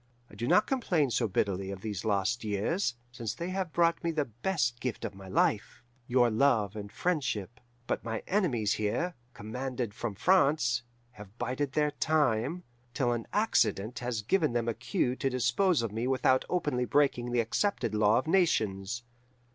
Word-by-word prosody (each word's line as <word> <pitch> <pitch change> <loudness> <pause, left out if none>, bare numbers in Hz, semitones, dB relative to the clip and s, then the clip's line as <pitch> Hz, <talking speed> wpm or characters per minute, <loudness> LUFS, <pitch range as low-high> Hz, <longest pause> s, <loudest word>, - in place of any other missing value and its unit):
I - - -18
do 120 - -4
not 210 - +5
complain 175 - +1
so 115 0 +1
bitterly 95 -1 -1
of 95 -1 -6
these 105 -3 -4
lost 110 +2 0
years, 110 - -1 0.2
since 120 -3 -4
they 170 +7 -4
have 185 -2 -2
brought 170 0 +2
me 170 - 0
the 155 -3 0
best 120 - -1
gift 125 -2 -3
of 105 - -4
my 95 0 -11
life, 105 +6 0 0.2
your 120 -2 +3
love 110 -4 +2
and 100 -1 -7
friendship; 125 - -2 0.3
but - - -2
my 115 -1 -4
enemies 135 - +1
here, 110 +12 -1 0.2
commanded 125 +1 -4
from 110 -1 -4
France, 140 - +3 0.3
have 105 -2 -13
bided 130 +3 -2
their 150 -1 +2
time, 150 +1 +1 0.3
till 125 -4 +1
an 120 -1 -3
accident 125 - +1
has 120 -3 -3
given 155 - +2
them 120 -1 0
a 115 - +1
cue 130 - -1
to 135 - 0
dispose 130 +5 +2
of 115 - -2
me 115 +3 -2
without 130 0 +2
openly 145 -8 0
breaking 125 -4 +1
the 120 - +1
accepted 115 - 0
law 105 +1 +4
of 130 - 0
nations. 120 - +1
120 Hz, 170 wpm, -30 LUFS, 110-150 Hz, 0.3 s, not